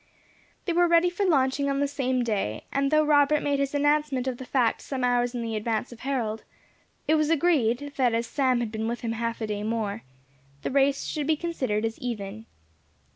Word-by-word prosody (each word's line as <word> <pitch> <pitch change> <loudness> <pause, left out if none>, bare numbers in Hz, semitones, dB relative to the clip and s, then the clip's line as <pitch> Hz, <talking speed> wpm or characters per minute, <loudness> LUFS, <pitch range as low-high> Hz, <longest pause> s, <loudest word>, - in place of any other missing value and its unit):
They 345 - 0
were 350 +1 +4
ready 340 +1 +4
for 390 +2 0
launching 280 -3 +2
on 275 0 0
the 285 - +2
same 260 -3 -1
day; 200 - -2
and 275 0 +1
though 305 +1 +4
Robert 295 0 +4
made 285 -1 +1
his 280 +1 -1
announcement 290 -2 +1
of 255 -2 -3
the 260 - -8
fact 245 -4 +1
some 265 -2 -4
hours 245 0 +1
in 240 - -2
the 225 -1 -3
advance 220 +2 -2
of 240 - -11
Harold, 235 -5 -2 0.6
it 310 - +4
was 305 -1 +2
agreed, 285 -5 +1
that 245 -4 +2
as 230 +1 0
Sam 255 0 +1
had 230 -3 -3
been 220 0 -3
with 235 +1 -3
him 230 - -2
half 230 0 -3
a - - 0
day 210 -1 -3
more, 215 -1 -2 0.6
the - - -2
race 275 +1 +2
should 295 -2 -3
be 315 -1 +2
considered 260 -11 -1
as 225 0 -4
even. 220 -2 -5
260 Hz, 210 wpm, -26 LUFS, 230-285 Hz, 0.6 s, were